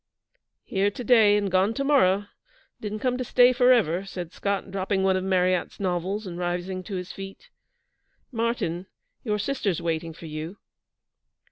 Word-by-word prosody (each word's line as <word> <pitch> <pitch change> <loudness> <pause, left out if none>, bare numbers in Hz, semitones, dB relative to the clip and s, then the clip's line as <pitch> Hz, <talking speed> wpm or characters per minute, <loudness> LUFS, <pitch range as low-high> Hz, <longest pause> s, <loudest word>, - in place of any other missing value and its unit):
'Here 195 0 +1
to 225 +5 -7
day 220 -4 +5
and 200 -2 -1
gone 190 +4 +2
to 275 - -1
morrow. 205 -9 +3 0.5
Didn't 210 0 -5
come 250 -1 0
to - - 0
stay 245 +1 +5
for 250 0 +5
ever,' 185 -7 +3
said 180 -3 -7
Scott, 200 -1 -2
dropping 190 0 -1
one 190 -1 +3
of 185 - -1
Marryat's 185 -1 +1
novels, 190 +2 -2
and 175 -2 -6
rising 180 +1 -2
to 200 - -5
his 180 -1 -5
feet. 195 0 -10 0.8
'Martyn, 225 -7 -2 0.4
your 210 -3 0
sister's 210 - -1
waiting 165 0 -2
for 165 - -12
you.' 155 +5 -6
195 Hz, 160 wpm, -26 LUFS, 180-220 Hz, 0.8 s, day